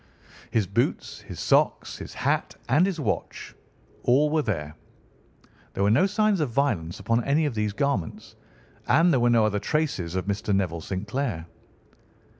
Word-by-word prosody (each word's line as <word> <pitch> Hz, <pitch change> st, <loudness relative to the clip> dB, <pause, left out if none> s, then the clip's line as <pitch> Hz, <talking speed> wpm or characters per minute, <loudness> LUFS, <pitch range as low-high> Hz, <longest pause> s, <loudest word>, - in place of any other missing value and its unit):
His 110 Hz, -3 st, +1 dB
boots, -, -, -1 dB
his -, -, -10 dB
socks, -, -, +1 dB
his -, -, -8 dB
hat, -, -, -1 dB
and 150 Hz, +9 st, +4 dB
his 185 Hz, -4 st, -3 dB
watch—all 145 Hz, 0 st, -2 dB
were 155 Hz, 0 st, +2 dB
there. 75 Hz, -, -3 dB, 1.0 s
There 100 Hz, -, 0 dB
were 100 Hz, -, +3 dB
no 155 Hz, -, +4 dB
signs 210 Hz, -1 st, +1 dB
of 150 Hz, -4 st, 0 dB
violence 110 Hz, -, -1 dB
upon 115 Hz, +1 st, 0 dB
any 145 Hz, +5 st, +2 dB
of 145 Hz, -, -1 dB
these 105 Hz, -2 st, -1 dB
garments, 140 Hz, -, -2 dB, 0.5 s
and 165 Hz, +3 st, +4 dB
there 130 Hz, -, +3 dB
were 120 Hz, 0 st, +3 dB
no 115 Hz, -2 st, +4 dB
other 105 Hz, -1 st, 0 dB
traces 135 Hz, -, -1 dB
of 95 Hz, -, -1 dB
Mr. 100 Hz, 0 st, -1 dB
Neville 85 Hz, -4 st, -1 dB
St. 95 Hz, +4 st, -5 dB
Clair. 115 Hz, -, -2 dB
115 Hz, 160 wpm, -25 LUFS, 100-150 Hz, 1.0 s, and